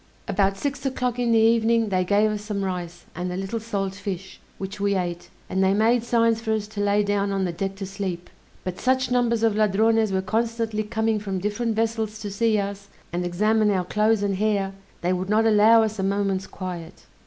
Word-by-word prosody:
About 195 -1 +1
six 285 +5 -3
o'clock 250 -2 -1
in 240 -1 +1
the 230 - +5
evening 225 0 +3
they 185 -2 +1
gave 205 +3 +3
us 210 -1 -3
some 210 -2 -3
rice 175 -2 -5
and 180 +1 -4
a 180 - -3
little 195 +4 -3
salt 200 -4 -3
fish, 195 -2 -6 0.2
which 195 +1 -6
we 200 0 +1
ate, 175 -2 -3 0.2
and 190 +1 0
they 190 +1 +3
made 225 +3 +3
signs 230 -1 +2
for 220 -1 -1
us 215 -1 -2
to 210 -1 -4
lay 205 0 +2
down 200 0 0
on 195 -1 0
the 175 - -1
deck 195 +3 -3
to 195 0 -5
sleep; 190 -3 -5 0.4
but 185 -1 -5
such 260 0 +1
numbers 235 -2 +2
of 225 -2 +3
Ladrones 215 +1 +3
were 190 0 0
constantly 225 +1 -1
coming 220 0 0
from 195 -2 -3
different 210 +4 -1
vessels 220 -1 -1
to 205 -2 -5
see 220 +2 +2
us, 200 0 -4 0.3
and 175 +1 -1
examine 210 +5 +2
our 185 -3 +1
clothes 215 +2 +2
and 200 -2 0
hair, 200 -2 0 0.3
they 180 +1 +1
would 185 +1 -3
not 220 +2 +3
allow 225 +1 +6
us 220 -1 -3
a - - 0
moment's 195 -1 0
quiet. 180 -2 -7
205 Hz, 210 wpm, -24 LUFS, 195-225 Hz, 0.4 s, allow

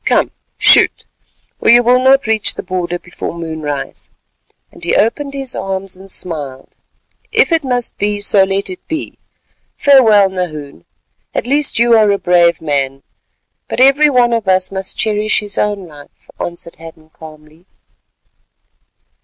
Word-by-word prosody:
Come, - - +1 0.3
shoot, - - +4 0.5
or - - +1
you 240 +1 +6
will 250 +1 +4
not 270 +1 +3
reach 220 -1 +1
the - - -6
border 180 -2 -3
before 175 -1 -7
moonrise," 160 -4 -5 0.6
and - - -17
he - - 0
opened 275 +6 0
his 270 -2 -4
arms 195 -1 -5
and 190 +1 -13
smiled. 145 -8 -5 0.6
"If 460 -5 +3
it 325 -2 +2
must 245 -2 -3
be, 205 0 -1
so 205 -1 +4
let 195 0 -2
it 185 - -8
be. 315 0 -5 0.6
Farewell, 225 -8 +5
Nahoon, 155 - -6 0.5
at - - -1
least 285 +3 +1
you 235 +1 +3
are 215 -2 +4
a 200 - +2
brave 175 -3 +2
man, 135 -3 -2 0.6
but - - -4
every 275 +3 +5
one 245 -3 +2
of 225 -4 -2
us 185 0 +1
must 190 -1 -4
cherish 215 0 0
his 205 -2 -3
own 205 -3 -2
life," 145 -2 -17
answered 170 -1 -6
Hadden 160 -1 -14
calmly. 155 +2 -15
195 Hz, 150 wpm, -15 LUFS, 170-240 Hz, 0.6 s, you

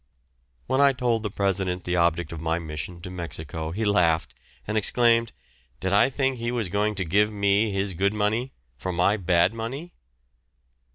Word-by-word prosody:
When 130 - +1
I 140 -1 +6
told 120 -3 0
the 105 - -3
President 95 -2 -1
the 90 - -1
object 85 -1 +1
of 80 -2 -6
my 80 0 0
mission 80 +1 -6
to 90 +1 -7
Mexico 80 -3 -5
he 105 +7 -2
laughed, 85 -6 +2 0.3
and 110 - -3
exclaimed, 115 +1 +3 0.5
"Did 95 +1 -1
I 100 +6 +5
think 135 -1 0
he 120 0 -2
was 115 -6 -2
going 105 +2 0
to 95 -2 -2
give 105 +6 +2
me 100 +1 +2
his 100 0 -1
good 100 +4 0
money 110 +5 0 0.3
for 95 +9 -4
my 90 +4 +2
bad 90 -1 +2
money?" 130 +10 -6
100 Hz, 175 wpm, -25 LUFS, 85-110 Hz, 0.5 s, I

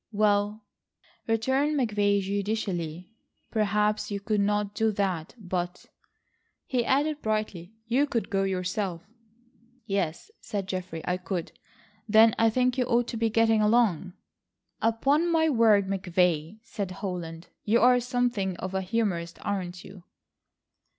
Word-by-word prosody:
"Well," 210 0 +1 0.6
returned 265 +7 +1
McVay 205 -4 +2
judicially, 195 -3 -3 0.4
"perhaps 210 -1 +1
you 200 -1 -3
could 210 +1 -1
not 205 0 0
do 220 +1 +1
that, 185 -4 -2
but," 180 -3 -4 0.8
he 250 -2 0
added 290 +4 +1
brightly, 215 -3 -3
"you 255 +5 +2
could 235 -5 -2
go 195 -1 +1
yourself." 185 -1 -2 0.8
"Yes," 195 - -2
said 200 -2 -4
Geoffrey, 185 -3 -5
"I 180 - 0
could—" 180 -2 -4 0.6
"Then 220 +1 +7
I 225 0 +5
think 250 +2 +1
you 250 - +2
ought 240 -1 +1
to 230 - -4
be 225 0 +1
getting 225 0 +3
along." 210 -5 +2 0.7
"Upon 275 +9 +2
my 320 -1 +3
word, 220 -7 +4
McVay," 180 -2 0
said 200 -5 -5
Holland, 180 -3 -6
"you 225 +3 +3
are 250 0 +5
something 240 -7 -1
of 185 0 -5
a 190 - 0
humorist, 185 -5 -2
aren't 180 -3 -3
you?" 190 -2 -12
205 Hz, 130 wpm, -27 LUFS, 185-230 Hz, 0.8 s, Then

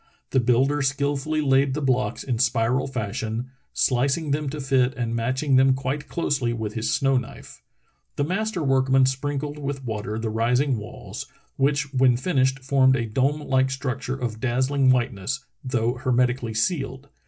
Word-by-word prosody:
The 130 - +3
builder 130 +4 +2
skilfully 140 +3 0
laid 135 -1 +3
the - - -1
blocks 130 -3 0
in 120 -4 -2
spiral 120 +2 +1
fashion, 110 +1 -4 0.2
slicing 140 +4 +1
them 145 0 0
to 150 - -5
fit 130 -2 +1
and 115 -2 -2
matching 130 +4 +1
them 130 0 +5
quite 140 +2 -3
closely 135 -8 0
with 110 -2 -4
his 110 0 -1
snow 135 -1 +2
knife. 125 - -7 0.5
The 145 - 0
master 190 +2 -1
workman 135 -1 +3
sprinkled 145 +2 -2
with 140 -2 -4
water 110 -1 -3
the 110 -1 -2
rising 125 +3 +1
walls, 105 - -8 0.3
which 145 +1 0
when 130 -2 +4
fin 145 +4 -2
ished 130 0 +1
formed 130 -1 +4
a 120 - -1
dome 135 +7 0
like 130 -2 +1
structure 130 0 -3
of 120 -4 -4
dazzling 130 +2 +1
white 125 0 +3
ness, 125 +8 -4 0.2
though 120 -2 0
hermetically 125 -2 0
sealed. 135 +1 -1
130 Hz, 165 wpm, -24 LUFS, 120-140 Hz, 0.5 s, them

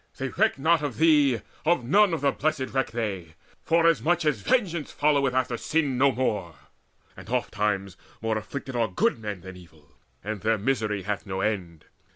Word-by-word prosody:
They 135 0 -3
reck 220 +5 +1
not 160 +3 +3
of 145 -5 -4
thee, 150 -6 +4 0.2
Of 165 -5 +2
none 200 - +4
of 165 -4 -2
the 140 -1 +3
Blessed 145 -3 -2
reck 135 -1 0
they, 100 -8 -4 0.3
forasmuch 165 0 +2
As 145 -9 +1
vengeance 170 - 0
followeth 140 -3 +2
after 125 -2 0
sin 145 -2 0
no 140 0 +5
more; 105 -10 -2 0.6
And - - -12
ofttimes 105 -5 -1 0.2
more 110 -1 -1
afflicted 125 +4 -5
are 115 -2 +2
good 95 +4 0
men 105 -4 -5
Than 95 0 -10
evil, 80 -5 -17 0.3
and 105 -1 -4
their 110 0 +2
misery 105 -3 -1
hath 100 +1 -3
no 95 0 -3
end. 90 -7 -3
125 Hz, 175 wpm, -26 LUFS, 105-150 Hz, 0.6 s, no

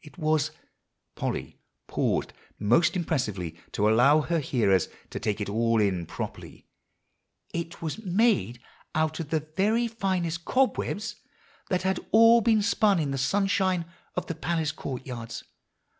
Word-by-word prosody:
It 150 +3 -15
was" 155 -2 +1 0.6
Polly - - -4 0.3
paused - - -1 0.2
most 120 - +3
impressively 110 - -2 0.2
to 105 - +2
allow 130 +8 +5
her 170 +2 0
hearers 105 - +2 0.2
to - - -4
take 105 0 -1
it 105 - -2
all 115 +2 +2
in 95 -5 0
properly, - - -7 0.9
"it 170 0 -5
was 165 +8 -4
made 185 - +2 0.4
out 155 +1 0
of 160 -3 -5
the 160 -1 +1
very 220 +5 +2
finest 185 -6 -2
cobwebs 235 -3 0 0.5
that 180 -1 0
had 190 0 +1
all 230 +1 +7
been 220 -2 +3
spun 210 -2 +3
in 150 -4 -1
the 135 - -2
sunshine 190 +3 +1 0.3
of 180 - -2
the 165 - -3
palace 160 -1 -1
court 130 -3 -6
yards. 120 -3 -6
160 Hz, 145 wpm, -27 LUFS, 120-190 Hz, 0.9 s, all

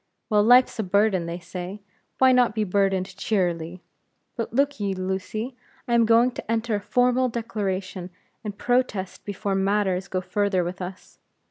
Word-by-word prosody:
Well, 210 -1 +5
life's 245 +2 +5
a - - +1
burden, 195 -2 +2
they 170 +1 -4
say; 180 +3 -7 0.4
why 260 0 +6
not 245 -3 +3
be 215 - +1
burdened 195 -1 0
cheerily? 180 -4 -1 0.5
But 230 -2 -3
look 280 +3 +1
ye, 200 -2 -1
Lucy, 190 +6 -3 0.3
I 240 - 0
am 230 -1 +4
going 230 +2 +5
to 230 - -6
enter 230 0 0
a 205 - 0
formal 250 +3 +2
declaration 195 -5 -3 0.3
and 205 -2 -6
protest 245 -7 -1
before 200 0 -3
matters 195 -1 +1
go 185 - -2
further 195 0 0
with 180 +2 -5
us. 185 +1 -9
205 Hz, 160 wpm, -24 LUFS, 185-230 Hz, 0.5 s, why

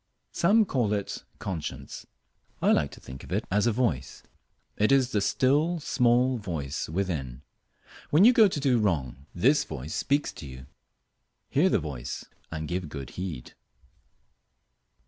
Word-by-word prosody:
Some 210 +5 +4
call 120 - 0
it 100 -1 -4
"conscience." 90 -6 -6 0.5
I - - +3
like 75 -2 +2
to - - -12
think 65 0 -10
of - - -12
it - - 0
as 105 +4 +2
a - - +4
voice. 95 - -1 0.5
It 105 +4 +2
is 130 -2 +4
the 105 - +1
still, 145 - +2
small 125 -2 +2
voice 80 -10 -4
within. 75 -8 -3 0.7
When 160 +7 +6
you 245 - +8
go 220 -3 +7
to 180 - -3
do 130 -4 +2
wrong 70 - -1
this 130 - +4
voice 70 +6 -7
speaks 145 +1 0
to 85 -4 -9
you. 65 -1 -10 0.9
Hear 165 +7 +4
the - - +3
voice, 70 -6 -5 0.3
and 80 -1 -4
give 85 -1 -3
good 70 -4 -7
heed. 85 -8 -6
100 Hz, 150 wpm, -27 LUFS, -, 0.9 s, you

